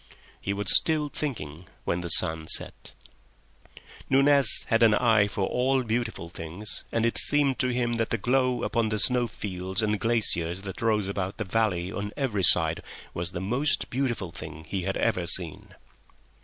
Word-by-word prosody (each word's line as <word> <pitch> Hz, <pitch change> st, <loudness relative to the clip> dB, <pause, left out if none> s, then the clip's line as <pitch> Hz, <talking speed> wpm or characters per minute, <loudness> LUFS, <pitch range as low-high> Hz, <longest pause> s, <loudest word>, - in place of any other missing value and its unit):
He 100 Hz, -, -3 dB
was 100 Hz, -1 st, +5 dB
still 155 Hz, -2 st, +2 dB
thinking 90 Hz, -, -6 dB, 0.2 s
when 85 Hz, -, -2 dB
the 85 Hz, -, -6 dB
sun 80 Hz, -1 st, +4 dB
set. -, -, -1 dB, 1.2 s
Nunez 135 Hz, -3 st, +4 dB
had 115 Hz, -, +2 dB
an 110 Hz, -2 st, +5 dB
eye 110 Hz, -4 st, +3 dB
for 100 Hz, -1 st, -3 dB
all 130 Hz, +4 st, 0 dB
beautiful 115 Hz, -6 st, -3 dB
things, 85 Hz, +5 st, -5 dB
and 115 Hz, 0 st, 0 dB
it 115 Hz, -, 0 dB
seemed 145 Hz, -3 st, +1 dB
to 130 Hz, -, +1 dB
him 120 Hz, -1 st, -1 dB
that 115 Hz, -1 st, -2 dB
the 115 Hz, -, -1 dB
glow 125 Hz, +3 st, 0 dB
upon 115 Hz, -2 st, -1 dB
the 105 Hz, -, -2 dB
snow 120 Hz, +3 st, +2 dB
fields 95 Hz, -1 st, -4 dB
and 105 Hz, -1 st, -1 dB
glaciers 95 Hz, -6 st, +1 dB
that 95 Hz, -2 st, -8 dB
rose 110 Hz, -3 st, 0 dB
about 100 Hz, -1 st, -4 dB
the 110 Hz, -, -3 dB
valley 95 Hz, -3 st, -1 dB
on 105 Hz, +1 st, -6 dB
every 125 Hz, -8 st, -2 dB
side 90 Hz, -, +5 dB, 0.3 s
was 85 Hz, +1 st, -4 dB
the 90 Hz, -, -6 dB
most 125 Hz, +10 st, -1 dB
beautiful 120 Hz, -9 st, -3 dB
thing 80 Hz, -1 st, -9 dB
he 95 Hz, +4 st, -4 dB
had 95 Hz, -, -2 dB
ever 90 Hz, -2 st, -1 dB
seen. 85 Hz, -3 st, -2 dB
105 Hz, 170 wpm, -26 LUFS, 90-120 Hz, 1.2 s, was